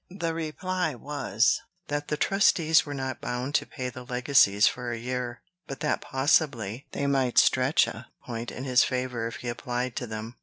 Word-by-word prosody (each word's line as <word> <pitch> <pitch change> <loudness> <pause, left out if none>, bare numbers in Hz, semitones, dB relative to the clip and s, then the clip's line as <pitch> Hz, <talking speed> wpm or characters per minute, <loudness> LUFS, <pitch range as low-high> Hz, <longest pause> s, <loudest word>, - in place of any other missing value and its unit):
The 170 -3 -3
reply 165 0 -2
was, 125 -4 +1 0.3
that 145 0 -3
the 150 - -1
trustees 165 -4 +3
were 145 - -4
not 130 -2 -4
bound 125 +3 -3
to - - +1
pay 130 -2 -4
the 125 +1 -9
legacies 125 -5 +4
for 125 0 0
a 120 - -3
year, 125 0 -4 0.2
but 135 - -7
that - - 0
possibly 130 -5 +1
they 140 - -2
might 135 -3 +1
stretch 130 +3 +5
a 115 +2 -8 0.2
point 115 -1 -5
in 130 - -7
his 125 -2 +4
favor 125 -2 -2
if 115 - -6
he 125 - -7
applied 125 0 -3
to 125 - -3
them. 110 +2 -7
125 Hz, 185 wpm, -27 LUFS, 120-145 Hz, 0.3 s, stretch